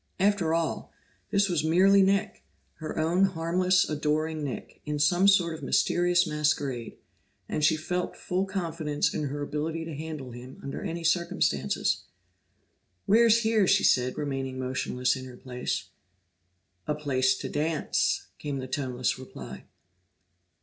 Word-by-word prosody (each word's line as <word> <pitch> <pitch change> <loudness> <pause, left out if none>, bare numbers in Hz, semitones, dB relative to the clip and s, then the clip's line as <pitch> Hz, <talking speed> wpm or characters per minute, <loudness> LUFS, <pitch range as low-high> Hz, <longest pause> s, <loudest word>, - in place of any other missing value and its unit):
After 195 -4 +2
all, 165 0 -1 0.4
this 200 0 +3
was 170 -5 0
merely 190 +5 +5
Nick, 200 +2 +1 0.3
her 155 -1 -6
own 165 +4 +2
harmless, 180 +1 +2
adoring 155 +1 -1
Nick, 135 -3 -6
in 150 0 -3
some 175 +6 +3
sort 180 -4 +4
of 160 - -8
mysterious 175 +1 +2
masquerade, 145 -6 -1 0.5
and 155 - -2
she 160 +1 +4
felt 180 +3 -3
full 185 +2 -1
confidence 165 -6 -1
in 155 - -2
her 145 +1 -3
ability 160 +3 -3
to 165 - -6
handle 150 -3 -6
him 125 +2 -10
under 140 - -5
any 170 -4 -4
circumstances. 170 +1 +1 1.0
"Where's 230 +1 +5
here?" 220 -3 +3
she 195 +1 +4
said, 125 0 +3
remaining 135 -3 -3
motionless 130 0 -1
in 130 0 -7
her 125 -1 -11
place. 125 -1 -4 1.0
"A 150 - 0
place 130 -3 +1
to - - -5
dance," 155 +1 0
came 145 -2 -3
the 130 - -4
toneless 130 -2 -2
reply. 130 - -9
155 Hz, 140 wpm, -28 LUFS, 140-180 Hz, 1.0 s, merely